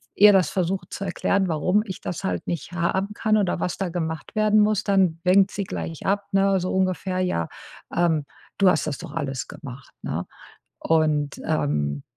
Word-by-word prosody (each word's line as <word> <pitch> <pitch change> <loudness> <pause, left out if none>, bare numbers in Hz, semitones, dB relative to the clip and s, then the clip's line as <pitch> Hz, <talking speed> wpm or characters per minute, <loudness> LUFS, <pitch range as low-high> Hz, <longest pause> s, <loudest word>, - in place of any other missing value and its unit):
ihr 205 +1 +8
das 185 -5 +4
versucht 185 -1 -2
zu - - -4
erklären, 190 +1 +1
warum 180 +6 +2
ich 190 -4 -7
das 175 - -5
halt 90 -2 -2
nicht 170 -1 -4
haben 190 +4 -1
kann 215 0 +2
oder 190 -4 0
was 180 - -2
da 190 -2 -2
gemacht 160 -2 -4
werden 215 0 +4
muss, 210 0 +2
dann 190 -5 +2
winkt 190 +2 +5
sie 200 - -3
gleich 165 -3 -6
ab, 200 +1 0
ne, 195 0 +3
so 185 +1 -2
ungefähr: 185 0 0
„Ja, 85 - -1 0.5
ähm, 165 -4 +2 0.3
du 195 -2 +6
hast 155 -3 +1
das 145 - -2
doch 170 -4 -8
alles 135 -5 -3
gemacht,“ 135 -4 -10
ne? 80 +3 -3 0.6
Und, 155 -3 +1
ähm, 75 - 0
180 Hz, 180 wpm, -24 LUFS, 155-195 Hz, 0.6 s, ihr